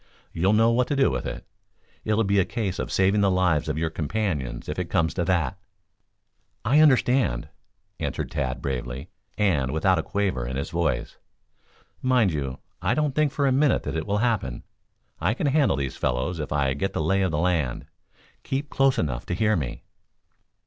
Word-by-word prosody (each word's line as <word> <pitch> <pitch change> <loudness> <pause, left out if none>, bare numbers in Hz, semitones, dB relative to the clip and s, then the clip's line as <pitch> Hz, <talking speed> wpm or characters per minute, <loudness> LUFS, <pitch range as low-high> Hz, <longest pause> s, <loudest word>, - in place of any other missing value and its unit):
You'll 95 +5 +2
know 115 +2 +4
what 125 +1 +2
to 145 - 0
do 135 -1 +3
with - - -3
it. - - -6 0.6
It'll 110 +1 +2
be 100 0 +2
a - - +5
case 100 -3 -3
of - - -3
saving 95 +2 +3
the 100 - +4
lives 90 -5 +2
of 75 - -1
your 80 0 -1
companions 75 - -2
if - - -3
it - - -3
comes 80 -1 +1
to 90 - -1
that." 90 +1 0 1.1
"I 135 +7 +4
understand," 130 - +3 0.5
answered - - -3
Tad 65 -1 -2
bravely; 65 +3 -4 0.3
and 85 -11 +2
without 90 +3 +2
a - - +1
quaver 95 -11 -1
in 65 - -4
his 70 - -3
voice. - - -1 0.8
"Mind 125 -8 +3
you, 70 -3 -3 0.2
I - - +1
don't 150 -2 +1
think 150 0 +2
for 140 0 0
a 135 - +3
minute 140 +2 +3
that 75 - -4
it 80 - -3
will 100 0 +1
happen. 95 - -1 0.6
I 95 +8 +1
can - - -2
handle 140 - +3
these 70 -1 -3
fellows 70 +8 -1
if 75 - -4
I 70 -2 +1
get 85 +8 -2
the - - -1
lay 95 +5 +2
of 95 - +2
the 75 - -1
land. 80 -7 0 0.6
Keep 140 +2 -3
close 135 -1 +3
enough 60 -6 -2
to 90 - -1
hear 110 +2 +2
me." 70 -8 -4
90 Hz, 190 wpm, -25 LUFS, 75-115 Hz, 1.1 s, a